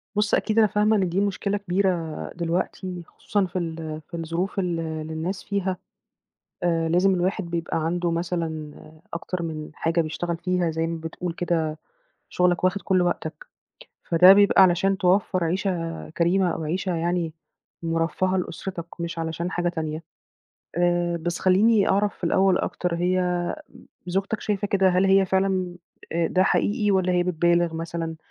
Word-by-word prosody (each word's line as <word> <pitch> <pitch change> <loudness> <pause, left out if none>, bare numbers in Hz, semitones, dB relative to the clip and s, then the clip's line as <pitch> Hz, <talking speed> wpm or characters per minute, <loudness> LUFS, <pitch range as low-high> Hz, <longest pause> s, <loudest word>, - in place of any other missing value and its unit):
بُصّ، 210 0 +1
أكيد 220 0 -1
أنا 215 - +6
فاهمة 210 +2 +2
إن 190 -4 +1
دي 185 +4 0
مشكلة 200 0 -1
كبيرة 195 0 +1 0.5
دلوقتي 175 +1 -3
خصوصًا 205 -2 -1
في 185 0 -3
ال 160 -2 -5
في 170 - -7
الظروف 165 +4 -2
ال 175 -3 -1
اللي 160 -1 -4
الناس 175 +5 -3
فيها. 195 -2 -2 0.9
آآ 165 -2 +1
لازم 180 +3 +3
الواحد 185 +3 0
بيبقى 170 -1 -2
عنده 175 +1 0
مثلًا 165 -3 -3 0.4
أكتر 170 +1 -4
من 155 -2 -5
حاجة 165 +2 0
بيشتغل 170 +2 -3
فيها، 180 -1 0
زي 160 +1 -1
ما 165 0 -3
بتقول 165 +2 -5
كده 165 -3 -1 0.5
شُغلك 180 0 +1
واخِد 185 +2 +2
كلّ 185 -2 +2
وقتك. 340 - -3 0.6
فده 180 +3 +7
بيبقى 200 -1 +5
علشان 190 +1 +4
توفّر 185 0 +2
عيشة 170 -1 -2
كريمة 180 +2 +3
أو - - -4
عيشة 180 +3 -1
يعني 170 -1 -1 0.5
مُرفّهة 165 +3 0
لأُسرتك 175 0 -4 0.2
مش 170 0 -4
علشان 165 +2 -3
حاجة 175 0 0
تانية. 160 -2 -4 0.7
آآ 175 0 +1
بس 170 +1 -3
خلّيني 200 +3 +4
أعرف 200 +1 +2
في - - -6
الأول 190 +2 +3
أكتر، 180 -1 -2
هي 180 0 0 0.5
زوجتك 195 +4 -1
شايفة 205 -1 -1
كده، 195 -1 +3
هل 185 +1 +3
هي 195 0 +5
فعلًا 190 -1 0 0.4
آآ 170 0 +1
ده 185 - +2
حقيقي، 210 +2 +1
والّا 185 -2 +2
هي 180 - +3
بتبالغ 175 -1 +2
مثلًا، 165 0 -4
175 Hz, 155 wpm, -24 LUFS, 165-190 Hz, 0.9 s, فده